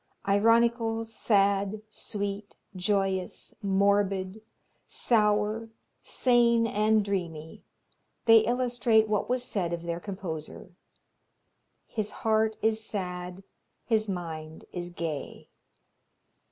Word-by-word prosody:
Ironical, 225 +2 +3
sad, 200 -2 +1
sweet, 205 -3 -5 0.2
joyous, 190 -1 -1
morbid, 200 0 +1 0.5
sour, 215 0 +1 0.3
sane 235 -2 +3
and 215 -1 +2
dreamy, 165 -6 -4 0.6
they 225 -1 +8
illustrate 235 -2 +2
what 210 +1 -1
was 250 0 0
said 180 -8 -2
of 170 -1 -4
their 170 0 -3
composer 180 -3 -7 1.1
"his 215 -2 -3 0.2
heart 220 0 +2
is 220 0 +1
sad, 180 -3 -5 0.4
his 220 -2 +1
mind 160 -4 -6
is 175 -1 -4
gay." 165 -5 -5
205 Hz, 90 wpm, -28 LUFS, 185-220 Hz, 1.1 s, they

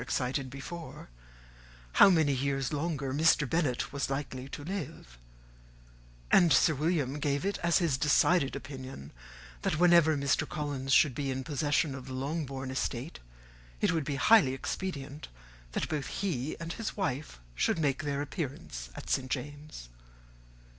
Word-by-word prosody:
_]] - - -3
excited 130 +2 -1
before, 150 - -8 0.8
how 195 - +8
many 160 -6 +3
years 135 +1 -1
longer 145 -3 -2
Mr. 150 -1 +4
Bennet 145 -4 0
was 140 -1 -2
likely 135 -1 -4
to 145 - -7
live; 155 - -6 1.1
and 175 -3 +6
Sir 155 +4 +5
William 150 -2 0
gave 145 +2 0
it 200 - -1
as 170 -1 +3
his 155 -7 +1
decided 150 0 +3
opinion, 130 - -8 0.5
that 155 - 0
whenever 170 -3 +5
Mr. 140 -1 +1
Collins 140 -3 -3
should 135 0 +5
be 140 +2 -3
in 130 0 -2
possession 145 +1 0
of 135 -1 -8
the 130 - -6
Longbourn 135 -1 -3
estate, 130 +2 -3 0.6
it - - +2
would 160 -3 -1
be 145 -1 -2
highly 140 -3 +5
expedient 145 -1 -5 0.5
that - - -1
both 150 -3 -3
he 155 -8 -2
and 165 0 -5
his 225 -2 -5
wife 145 - -3
should - - +1
make 145 -3 0
their 145 -1 -2
appearance 130 - -5
at - - -9
St. 130 -1 0
James's. 145 - -6
145 Hz, 150 wpm, -30 LUFS, 130-160 Hz, 1.1 s, how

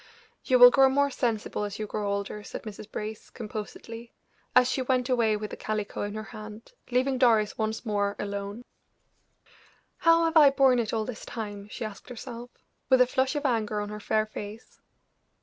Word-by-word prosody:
"You 255 - +3
will 245 0 +10
grow 270 0 +6
more 280 +1 +2
sensible 225 -4 -2
as 205 -1 -4
you 215 - -3
grow 205 -1 -3
older," 200 +1 -3
said - - -8
Mrs. 215 0 -9
Brace, 215 0 -6
composedly, 230 +1 -8 0.4
as 255 -1 +6
she 260 - -1
went 255 0 0
away 230 -4 +2
with 210 0 -6
the - - -5
calico 215 -1 -3
in 205 +1 -3
her 215 - -4
hand, 215 +1 -10 0.2
leaving 255 +1 +1
Doris 225 -4 +3
once 220 +2 -3
more 205 -2 0
alone. 200 +3 -5 1.3
"How 330 0 +4
have 325 0 -1
I 295 -3 +9
borne 270 -2 +4
it 225 -3 -1
all 220 -1 -1
this 245 -2 -7
time?" 205 -3 -6
she 220 - -5
asked 215 +2 -9
herself, 245 0 -8 0.4
with 260 - +6
a 250 - +7
flush 260 +2 0
of 295 0 -2
anger 220 -5 0
on 205 0 -4
her 210 0 -6
fair 215 +1 +1
face. 215 +1 -9
220 Hz, 185 wpm, -27 LUFS, 210-250 Hz, 1.3 s, will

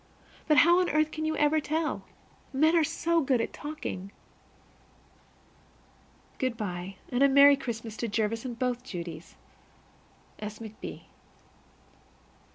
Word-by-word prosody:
But 305 -2 +4
how 345 +3 +6
on 365 - +1
earth 310 +1 +2
can 310 0 -3
you 315 0 -1
ever 300 +1 +3
tell? 310 +1 -2 0.5
Men 310 +5 +3
are 330 - +5
so 330 +2 +1
good 265 -4 +2
at 230 - -2
talking! 245 -11 -6 2.3
Good 255 -3 -1
by, 190 -3 -5 0.2
and 245 +1 0
a 280 - +6
merry 280 +1 +8
Christmas 230 -4 -5
to 235 - -2
Jervis 220 +1 -1
and 245 -3 -5
both 250 0 -1
Judies. 170 -7 -7 1.0
S. 210 0 -6
McB. 220 -1 -8
260 Hz, 130 wpm, -28 LUFS, 220-310 Hz, 2.3 s, merry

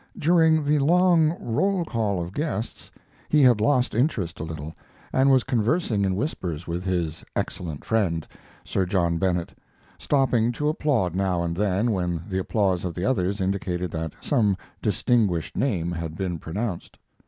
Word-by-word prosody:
During 160 -1 +4
the 150 +1 +3
long 170 +1 +4
roll 185 - 0
call 110 - -1
of 85 +2 -5
guests 145 -6 -3 0.4
he 150 -2 +4
had 120 -5 +5
lost 125 0 +2
interest 110 - 0
a - - -3
little, 80 -1 -6 0.4
and 135 +1 +4
was 130 -2 +5
conversing 115 - +1
in 95 -1 0
whispers 90 - -3
with 85 +2 -3
his 85 -4 -2
"excellent 85 -6 -4
friend," 95 -8 0 0.4
Sir 95 -2 -1
John 85 -3 +1
Bennett, 90 -3 -1 0.4
stopping 125 -5 +2
to 150 +5 0
applaud 135 - 0
now 90 -2 0
and 85 -1 -2
then 100 +4 +1
when 90 -4 -1
the 95 -2 -1
applause 95 -2 0
of 90 -3 -4
the 90 - -2
others 100 -5 0
indicated 90 -2 -2
that 80 -1 -4
some 105 -9 +2 0.2
distinguished 105 -5 +1
name 90 -11 0
had 80 -2 -4
been 90 -3 -2
pronounced. 95 +4 -4
100 Hz, 155 wpm, -25 LUFS, 90-130 Hz, 0.4 s, had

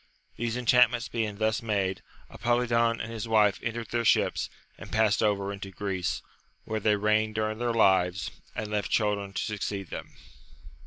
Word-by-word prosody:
These 120 +1 -2
enchantments 125 0 +4
being 110 -3 -2
thus 110 +1 +1
made, 100 -4 -1 0.3
Apolidon 115 -1 +1
and 115 - -5
his 115 -1 -5
wife 105 -3 +4
entered 115 -1 -4
their 120 0 0
ships, - - +2 0.3
and - - -11
passed 110 -2 +3
over 100 -2 +1
into 100 -1 -7
Greece, 95 -3 -3 0.4
where 110 0 -3
they 105 0 +3
reigned 105 +1 +1
during 110 0 -1
their 120 0 0
lives, 95 -4 +3 0.2
and 105 -1 -4
left 105 -1 -1
children 105 -2 0
to - - -2
succeed 100 -3 -4
them. - - -7
110 Hz, 160 wpm, -28 LUFS, 100-115 Hz, 0.4 s, enchantments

